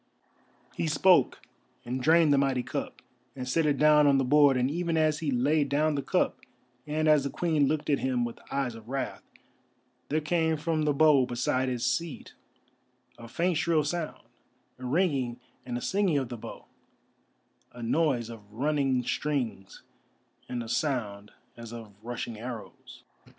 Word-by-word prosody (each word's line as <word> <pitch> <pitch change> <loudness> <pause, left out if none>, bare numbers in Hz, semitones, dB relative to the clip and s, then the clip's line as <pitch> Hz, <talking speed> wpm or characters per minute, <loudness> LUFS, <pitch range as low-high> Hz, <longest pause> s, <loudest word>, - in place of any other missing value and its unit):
_" - - -26
He 165 - -1
spoke, 155 -1 +3 0.4
and 125 +2 -3
drained 160 +1 +5
the 140 - +4
mighty 135 -2 +1
cup, - - -5 0.3
and 130 -2 -6
set 155 +4 +1
it 145 -2 +1
down 150 0 +5
on 140 -1 +5
the 135 - +2
board, 140 0 +5
and 125 0 +2
even 170 0 -1
as 155 -1 +2
he 155 - -2
laid 140 +3 +1
down 150 +2 +2
the 140 - -1
cup, - - 0 0.5
and 155 +1 0
as 150 -2 +5
the 140 - -2
Queen 155 -2 +1
looked 150 +1 -1
at 145 - +2
him 125 -2 0
with 120 - -7
eyes 135 -3 -1
of 115 0 -12
wrath, 135 0 -3 0.9
there 155 - +1
came 160 +1 0
from 155 0 -1
the 150 - +3
bow 140 -3 +4
beside 130 +2 0
his 125 -1 -2
seat 135 +5 -3 0.9
a 115 - -10
faint 170 +7 0
shrill 160 -1 +2
sound, 160 +1 -4 0.6
a 130 - -7
ringing 135 -6 0 0.3
and 120 -1 -3
a - - -5
singing 190 -3 +1
of 130 -3 -2
the 120 - -5
bow, - - -10 1.1
a 120 -1 -9
noise 120 -2 +1
of 105 -3 -13
running 135 +1 0
strings 120 -8 -3 0.7
and 120 -1 -3
a - - -9
sound 110 -6 -2 0.3
as 115 -1 -10
of 115 -3 -9
rushing 115 -1 -5
arrows. 115 -2 -9
140 Hz, 170 wpm, -28 LUFS, 125-155 Hz, 1.1 s, drained